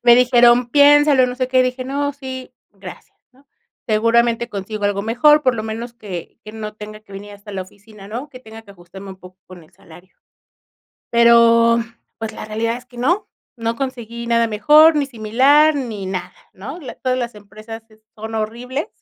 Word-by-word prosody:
Me 240 -1 +6
dijeron: 245 -1 +4
"Piénsalo", 290 -2 +5
no 250 0 -5
sé 255 0 -1
qué, 255 0 +3
dije: 255 0 -3
"No, 285 +2 -2
sí, 260 -2 -9 0.2
gracias", - - -13 0.2
¿no? 275 +2 -26 0.4
Seguramente 230 +2 +1
consigo 205 +1 -6
algo 200 0 0
mejor, 295 +7 +4
por 255 -2 +2
lo 215 - -4
menos 225 +2 -6
que 200 -6 -9
que 215 - -9
no 215 -1 -7
tenga 215 0 -10
que 205 -2 -19
venir 205 +1 -9
hasta 205 0 -12
la 190 -1 -4
oficina, 205 +1 -16
¿no? 250 +7 -6
Que 255 -3 -13
tenga 220 -1 -13
que 200 -2 -16
ajustarme 190 +2 -12
un 190 - -11
poco 185 +1 -15
con 180 -2 -13
el 155 - -22
salario. 175 +3 -18 0.9
Pero, 235 0 +5 0.4
pues, 225 -1 -5
la - - -8
realidad 225 +2 -2
es 250 - -12
que 245 -1 -16
no, 350 +11 0 0.3
no 230 0 -3
conseguí 235 -3 -6
nada 235 0 +2
mejor, 300 +9 +5
ni 290 -2 0
similar, 270 +6 +3
ni 225 -8 -5
nada, 185 -1 -5 0.2
¿no? 220 - -9
La 265 - -9
todas 255 -1 -2
las 240 -2 -4
empresas 215 +2 -11
es 215 0 -24
son 220 +1 -8
horribles. 240 +6 -4
230 Hz, 190 wpm, -19 LUFS, 215-255 Hz, 0.9 s, Me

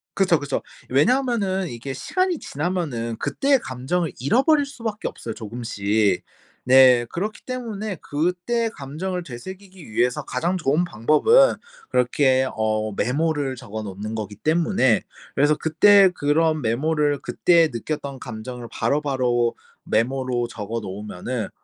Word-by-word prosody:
그쵸 180 -5 +3
그쵸. 145 - -2 0.3
왜냐하면은 200 - +1
이게 120 +3 -6
시간이 365 - -1
지나면은 145 -8 -3
그때의 275 -1 +1
감정을 135 - -2
잃어버릴 270 - +3
수밖에 230 -6 -5
없어요 115 - -6
조금씩. 105 -3 -1 0.4
네. 130 -2 +6
그렇기 210 +5 -4
때문에 220 -6 -4
그때의 180 +10 -1
감정을 175 +6 -5
되새기기 185 - -10
위해서 120 +3 +1
가장 170 +9 -1
좋은 160 0 +1
방법은 175 - +4 0.3
그렇게 130 +1 +2
어 110 -1 -1
메모를 145 +3 0
적어 110 -2 -7
놓는 105 +2 -6
거기 105 -2 -5
때문에 155 - +2 0.3
그래서 145 +2 +3
그때 195 +5 +5
그런 155 0 +1
메모를 145 +5 +1
그때 170 -2 +3
느꼈던 140 +2 -4
감정을 120 +1 -7
바로바로 125 -2 0 0.3
메모로 125 +1 0
적어 115 0 -5
놓으면은 105 +3 -5
140 Hz, 310 characters per minute, -23 LUFS, 120-180 Hz, 0.4 s, 네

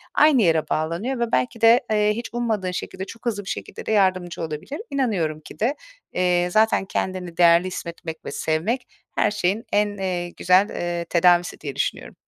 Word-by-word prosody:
aynı 295 -5 +5
yere 160 -2 +2
bağlanıyor 175 +12 -1
ve 235 -1 -1
belki 130 - 0
de, 230 +3 +7
eee, 210 0 +3
hiç 235 +1 -5
ummadığın 220 -6 -1
şekilde, 190 +1 -5
çok 230 +4 -12
hızlı 205 -4 -1
bir - - -6
şekilde - - -6
de - - -2
yardımcı 185 -5 +1
olabilir. 165 - -5
İnanıyorum 195 - -1
ki - - -13
de, 245 +7 +1 0.4
eee, 180 -1 +2
zaten 215 -1 +3
kendini 185 -3 -3
değerli 170 +1 +5
hissetmek 170 -2 -7
ve - - -5
sevmek 180 +11 -1 0.3
her 210 - +2
şeyin 205 +2 -1
en, 205 0 +1
eee, 180 -2 -2
güzel, 185 +4 +3
eee, 175 -1 -3
tedavisi 175 +1 +3
diye 140 -3 -5
düşünüyorum. - - -3
185 Hz, 175 wpm, -23 LUFS, 170-220 Hz, 0.4 s, de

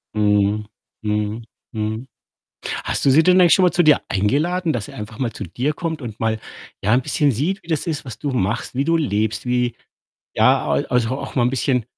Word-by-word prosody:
Mhm, 105 0 +2 0.4
mhm, 105 +1 -2 0.3
mhm. 110 +3 -3 0.8
Hast - - -2
du - - +6
sie 155 +5 +6
denn 185 +2 +5
eigentlich 175 -2 +6
schon 190 - +4
mal 180 - +3
zu 175 - +3
dir 155 -2 +5
eingeladen? 155 - +1
Dass 115 -5 -3
sie - - -12
einfach 110 +1 -8
mal 125 -4 -1
zu - - -6
dir 125 - -2
kommt 160 0 -4
und 115 -3 -7
mal, 110 0 0 0.4
ja, 105 - +3
'n 125 - +4
bisschen 145 +1 +1
sieht, 155 - -1
wie - - -20
das 160 0 -1
ist, 155 -4 -3
was 120 -5 -7
du 145 - -2
machst, 120 0 -1
wie 135 +2 0
du 165 +1 +2
lebst, 110 -8 -1
wie 125 0 0 0.6
ja, - - +3
al - - 0
also 125 +1 0
auch - - -7
mal 125 - +2
'n 125 - +2
bisschen 130 -2 0
125 Hz, 215 wpm, -21 LUFS, 110-150 Hz, 0.8 s, du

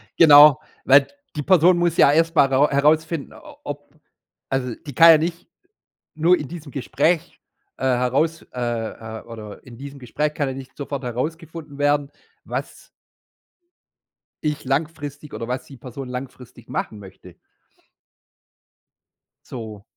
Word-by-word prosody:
Genau, 150 -1 +8 0.2
weil 135 +1 +6 0.3
die 150 - -2
Person 175 +2 +4
muss 170 -1 +1
ja 140 - +6
erst 165 +2 +2
mal 140 - +6
rau 135 +2 +3
herausfinden, 155 +2 +1
o 300 -2 -14
ob 145 +1 -8 0.5
also 125 -3 -2
die 145 - -7
kann 165 +5 +8
ja 160 - +9
nicht 170 +2 -4 0.7
nur 170 +3 +4
in 150 - -6
diesem 155 -2 -9
Gespräch, 165 +6 -1 0.4
äh, - - -8
heraus 130 +6 +1
äh, 115 -2 -4
äh, - - -15
oder 110 -3 -10
in 120 -2 -12
diesem 140 +1 -9
Gespräch 150 +5 -2
kann 145 -2 -2
ja 130 - -3
nicht 135 -1 -11
sofort 140 -1 -5
herausgefunden 155 +4 -5
werden, 145 0 +1 0.4
was - - -6 1.6
ich 150 0 -2
langfristig 145 0 -3
oder 115 - -6
was 125 +1 -3
die 135 - -14
Person 130 +2 -8
langfristig 125 -2 -9
machen 105 - -4
möchte. 95 -2 -14 2.1
So. 110 -5 -8
140 Hz, 140 wpm, -22 LUFS, 125-155 Hz, 2.1 s, ja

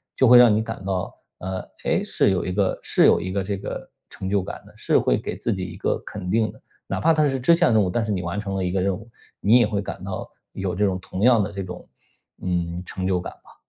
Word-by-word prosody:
就 130 - +4
会 125 +1 +9
让 120 -3 +8
你 110 - +2
感 110 -3 -6
到， 95 -2 -2 0.3
呃， 95 0 -4 0.3
诶， - - +2
是 - - +2
有 90 -2 0
一 90 - -2
个 95 0 +1
是 - - +3
有 - - +5
一 90 +2 -4
个 100 +1 0
这 100 +2 -2
个 95 - -6 0.2
成 95 - -6
就 100 0 +2
感 - - -7
的， - - -17
是 - - +2
会 - - +2
给 - - -5
自 115 - -1
己 95 -2 -4
一 90 -1 -8
个 - - 0
肯 95 -3 -6
定 110 +2 +2
的。 - - -19 0.3
哪 - - -2
怕 165 +1 +4
它 155 -1 +3
是 135 -1 -1
支 130 +7 +5
线 170 -7 +3
任 110 - +5
务， 95 - +1
但 115 +5 0
是 110 - -2
你 95 -3 -1
完 85 +2 -4
成 100 -2 -4
了 95 - -1
一 90 - 0
个 95 0 0
任 95 +1 +1
务， 110 +3 -14 0.3
你 115 +5 +5
也 120 - +5
会 105 -1 -1
感 100 - -7
到 - - -5 0.2
有 95 -2 -3
这 105 +3 +2
种 95 -2 0
同 95 - -6
样 120 -1 +5
的 100 +1 -2
这 100 -1 -4
种， 90 -1 -9 0.6
嗯， 90 -1 -2
成 95 0 -4
就 95 -1 +1
感 - - -6
吧。 - - -21
100 Hz, 300 characters per minute, -23 LUFS, 95-110 Hz, 0.6 s, 会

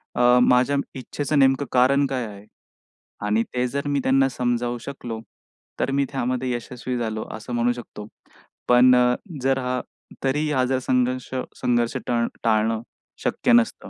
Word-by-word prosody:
अ, 125 0 +5
माझ्या 125 +3 +4 0.2
इच्छेचं 145 +3 -2
नेमकं 135 +1 +4
कारण 135 +3 +4
काय 130 -3 -2
आहे? 100 0 -11 0.8
आणि 105 +2 +2
ते 125 0 +1
जर 140 +3 -3
मी 145 -1 +1
त्यांना 135 0 +4
समजावू 120 -1 -1
शकलो 120 -5 -6 0.6
तर 135 - 0
मी 140 0 +1
त्यामध्ये 130 -1 -1
यशस्वी 125 +1 -4
झालो. 110 -2 -3
असं 110 +3 -7
म्हणू 120 +1 +2
शकतो. 105 -3 -9 0.6
पण 125 +1 +7
अ, 125 0 +4 0.3
जर 135 +1 +2
हा 125 0 -2 0.4
तरीही 150 +3 0
हा 130 - +2
जर 130 0 0
संघर्ष 125 0 0 0.2
संघर्ष 120 -1 0
टळ 120 -1 +1 0.2
टाळणं 110 0 +2 0.4
शक्य 250 - +1
नसतं. 235 -1 +2
125 Hz, 150 wpm, -23 LUFS, 120-135 Hz, 0.8 s, पण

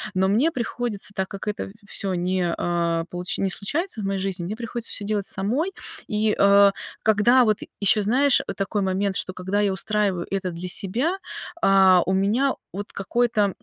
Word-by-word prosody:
Но 190 +1 +2
мне 230 +12 +3
приходится, 235 -6 -4
так 190 -1 -1
как 200 +1 -8
это 205 -1 -4 0.2
всё 195 -3 -1
не, 180 -1 -1
а, 170 -1 0
получ 180 0 -2
не 195 - 0
случается 290 - -2
в - - -4
моей 195 0 -1
жизни, 190 -2 -3
мне 210 - -4
приходится 235 0 -5
всё 205 - -4
делать 210 -2 -1
самой. 250 - -1 0.4
И, 215 -2 0
э, 200 0 +6 0.3
когда 220 +4 +4
вот 215 -1 +1 0.2
еще 205 +2 +5
знаешь, 260 +6 +4
э - - -3
такой 200 +1 -2
момент, 190 +1 -1
что 185 - +2
когда 190 +3 -2
я 200 -1 +1
устраиваю 195 -3 -1
это 190 -2 -2
для 175 +2 -6
себя, 245 - +1 0.4
а, 190 -2 +5
у 190 - +1
меня 215 +8 +1 0.2
вот 205 +2 -6
какое-то, 225 +3 0
м, 200 -2 +1
200 Hz, 185 wpm, -23 LUFS, 190-220 Hz, 0.4 s, э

